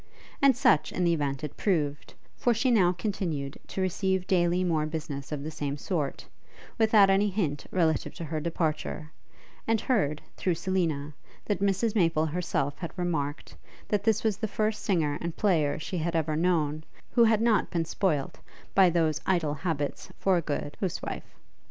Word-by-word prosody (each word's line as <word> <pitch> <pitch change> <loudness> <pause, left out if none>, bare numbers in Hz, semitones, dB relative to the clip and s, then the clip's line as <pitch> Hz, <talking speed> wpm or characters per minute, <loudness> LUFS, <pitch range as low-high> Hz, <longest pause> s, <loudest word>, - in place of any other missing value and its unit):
And 275 -3 +5
such, 155 - +3
in 180 - -1
the 170 -1 +3
event, 140 -3 -2
it 150 - -5
proved; 150 -7 -1 0.2
for 240 -1 +2
she 255 +3 +2
now 190 -7 +5
continued 170 -7 -3
to 190 - -4
receive 190 0 0
daily 175 -1 +2
more 160 -4 +1
business 150 -3 -5
of 145 -2 -3
the 155 - -4
same 145 -2 -3
sort, 150 -3 -3 0.5
without 215 -3 +6
any 200 +2 +3
hint 170 -8 -2
relative 165 -4 +1
to - - -6
her 155 0 -3
departure; 155 -1 -2 0.6
and 225 -1 +3
heard, 190 - 0
through 180 -3 0
Selina, 160 -5 -1 0.3
that 205 - -1
Mrs 200 +3 +1
Maple 165 -6 +2
herself 150 -4 -2
had 170 +1 -6
remarked, 155 -5 -2 0.3
that 205 -2 +1
this 220 -1 +2
was 215 -3 +1
the 220 - -2
first 215 +1 -1
singer 155 -7 +1
and 170 -1 -4
player 160 -9 +2
she 175 +3 -4
had 165 +1 -1
ever 155 -1 0
known, 155 -3 +1 0.3
who 235 -2 +5
had 220 -1 +4
not 225 -2 +2
been 170 -2 -1
spoilt 155 -5 -1 0.3
by 190 -2 +6
those 160 -3 +1
idle 170 -6 +2
habits 150 -2 -3
for 190 -1 +2
a 175 - +2
good 145 -1 -3
huswife. 190 -4 -4
170 Hz, 170 wpm, -28 LUFS, 150-195 Hz, 0.6 s, without